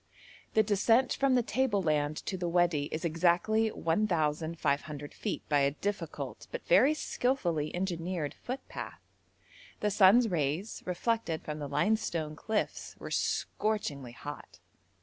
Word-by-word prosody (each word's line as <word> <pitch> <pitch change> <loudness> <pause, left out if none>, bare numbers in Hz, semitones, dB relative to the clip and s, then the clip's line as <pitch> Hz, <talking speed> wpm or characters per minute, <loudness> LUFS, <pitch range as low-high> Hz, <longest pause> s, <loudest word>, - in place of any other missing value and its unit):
The 220 - +6
descent 225 +5 +3
from 275 -1 +2
the 245 - +3
table 240 -3 +1
land 150 -3 0
to 195 - -2
the 180 -2 -2
Wadi 170 -4 +2
is 155 +3 -4
exactly 175 +7 +2
1,500 160 -5 -1
feet 210 - -4
by 145 -1 +3
a 140 0 +4
difficult, 200 +8 -4
but - - -6
very 310 - +5
skilfully 175 - 0
engineered 175 -3 -2
footpath. 260 +2 -6 0.8
The 210 - 0
sun's 205 +4 +6
rays, 165 +3 -1
reflected 180 -2 -1
from 150 0 -5
the 145 -1 -5
limestone 155 -1 0
cliffs, 215 +7 -2
were - - -8
scorchingly 145 - -1
hot. 145 +4 -9
175 Hz, 130 wpm, -31 LUFS, 155-220 Hz, 0.8 s, The